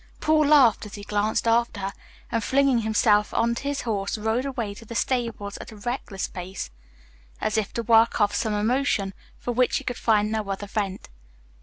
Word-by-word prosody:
Paul 310 -1 +3
laughed 260 -8 +5
as 205 - -9
he 205 - -8
glanced 210 +2 0
after 230 -1 +2
her 195 0 -3 0.4
and, 230 -2 0
flinging 275 -1 +3
himself 215 -1 +3
onto 235 0 +1
his 285 -1 -1
horse, 205 -3 -2
rode 220 +4 0
away 240 -7 -3
to 205 - -12
the 230 +1 -9
stables 230 -6 -1
at - - -9
a - - -11
reckless 205 -2 -4
pace, 180 - -6 0.7
as 215 - -1
if 215 -2 0
to 235 - -2
work 230 +1 +4
off 205 -1 +3
some 215 -2 0
emotion 215 -2 +1 0.2
for 245 - -4
which 250 +1 +2
he - - -5
could 245 - -3
find 215 -2 +2
no 215 -2 -2
other 195 +1 -3
vent. 200 -2 -3
220 Hz, 190 wpm, -25 LUFS, 205-240 Hz, 0.7 s, laughed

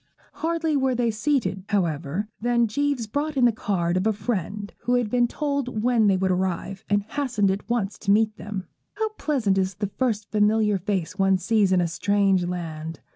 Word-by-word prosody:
Hardly 325 -1 0
were 265 -2 +2
they 235 -1 +1
seated, 215 - 0
however, 170 -1 -1
than 240 0 +3
Jeames 280 +2 -1
brought 290 +7 -2
in 250 - +5
the 240 - +5
card 180 -5 -1
of 185 +4 +1
a 220 - +3
friend 205 -1 -3
who 245 - 0
had 240 -4 0
been 245 -1 +3
told 280 -5 -2
when 235 -3 +3
they 195 -2 +4
would 190 0 +1
arrive, 185 +1 -2
and 205 0 +2
hastened 225 -4 0
at 195 +4 -5
once 215 -4 -1
to 200 - -5
meet 215 +1 +3
them. 200 -2 -6 0.3
How 440 +1 -1
pleasant 260 - 0
is 190 0 -1
the 205 -1 -3
first 220 -5 0
familiar 210 -1 +3
face 185 -1 -2
one 195 0 +4
sees 205 0 +2
in 185 -1 +4
a 175 - +1
strange 195 +1 +2
land! 165 -3 -5
210 Hz, 190 wpm, -24 LUFS, 190-245 Hz, 0.3 s, in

